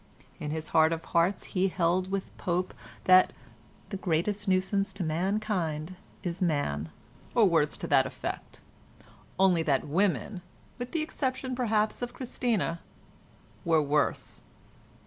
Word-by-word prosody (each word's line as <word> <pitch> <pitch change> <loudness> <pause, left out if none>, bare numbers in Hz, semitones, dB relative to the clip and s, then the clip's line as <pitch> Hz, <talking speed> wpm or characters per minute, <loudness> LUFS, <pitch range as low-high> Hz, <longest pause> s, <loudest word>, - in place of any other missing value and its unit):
In 150 - -4
his 155 +1 -4
heart 160 0 +5
of 165 - -4
hearts 175 +3 +2
he 190 0 0
held 185 0 +1
with 195 0 -3
Pope 180 +1 -1 0.3
that 185 0 +6 0.6
"the 195 - -3
greatest 190 +4 -1
nuisance 190 +1 +1
to 195 - -4
mankind 175 -1 -1 0.3
is 175 0 -4
man" 145 - 0 0.5
or - - +6
words - - +2
to - - -5
that - - +4
effect—only 110 - -3
that 140 -4 +1
women, 185 +3 0 0.4
with 245 0 -5
the 325 -2 0
exception 260 -4 -2
perhaps 220 -4 +1
of 245 0 -4
Christina, 230 -9 -1 0.8
were 165 -3 +4
worse. 145 +1 0
185 Hz, 125 wpm, -29 LUFS, 160-205 Hz, 0.8 s, that